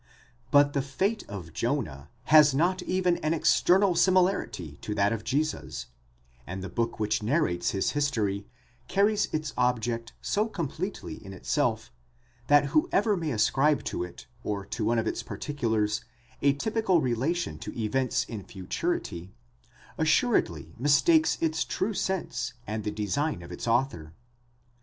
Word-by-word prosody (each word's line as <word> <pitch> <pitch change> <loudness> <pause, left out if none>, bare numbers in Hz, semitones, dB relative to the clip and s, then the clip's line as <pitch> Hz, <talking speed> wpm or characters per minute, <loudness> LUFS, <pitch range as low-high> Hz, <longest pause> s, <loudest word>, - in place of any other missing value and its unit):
But 145 0 +5
the 140 - +1
fate 190 +12 -1
of 90 -6 -7
Jonah 100 - -2 0.2
has 150 -3 +8
not 180 +5 +2
even 180 -1 +1
an 155 +2 0
external 185 +4 +4
similarity 170 - +1
to 105 - -4
that 100 +1 +2
of 110 -2 -4
Jesus; 155 +6 -2 0.6
and 95 +1 -5
the 95 - -5
book 115 -1 -2
which 105 0 0
narrates 105 - +1
his 95 - 0
history 110 -9 -1 0.4
carries 205 +2 +2
its 155 -1 -2
object 120 -2 0
so 210 +2 0
completely 185 -1 -5
in 95 -1 -9
itself, 90 - -1 0.6
that 145 -1 +6
who 155 - +3
ever 210 +1 +3
may 165 -4 -2
ascribe 135 +5 +2
to - - -3
it 90 - -9 0.2
or 100 -2 -3
to 115 - -4
one 115 +2 +2
of 115 - +1
its - - -2
particulars, 110 -7 -1 0.4
a 140 0 +4
typical 210 +3 +1
relation 140 +7 -1
to - - -7
events 125 +3 0
in 110 -6 -7
futurity, 95 -3 -4 0.6
assuredly 155 - +1
mistakes 230 - +4
its 160 -1 +1
true 210 +4 -2
sense 185 -11 -2
and 110 0 -3
the 105 - -1
design 105 - -2
of 85 - -10
its 90 - -6
author. 115 - 0
135 Hz, 145 wpm, -28 LUFS, 105-165 Hz, 0.6 s, has